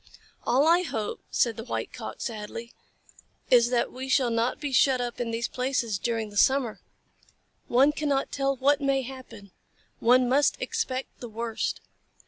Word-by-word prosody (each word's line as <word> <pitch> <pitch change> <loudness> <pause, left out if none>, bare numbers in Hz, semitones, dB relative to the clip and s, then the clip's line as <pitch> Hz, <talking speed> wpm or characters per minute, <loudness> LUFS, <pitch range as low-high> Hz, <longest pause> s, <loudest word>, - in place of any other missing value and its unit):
"All 270 +4 +4
I 340 +2 +5
hope," 225 -11 -4
said 235 -2 +1
the 225 - -5
White - - -4
Cock, - - -7
sadly, 230 +1 -6 0.8
"is 240 -1 +6
that 245 -1 +1
we 260 +1 -6
shall 255 -2 +3
not 230 +2 0
be 290 -2 -3
shut 265 0 +4
up 240 -1 -4
in 235 - -2
these 230 +1 -2
places 250 -5 -1
during 225 -2 -2
the 205 - -8
summer. 260 -1 +2 0.9
One 270 +4 +4
cannot 290 -3 -1
tell 275 0 0
what 280 +2 +2
may 275 -1 +1
happen. 255 -6 -10 0.5
One 250 +2 +4
must 280 +3 +3
expect 255 +1 -3
the 240 - -7
worst. 225 0 -3
250 Hz, 160 wpm, -27 LUFS, 230-270 Hz, 0.9 s, is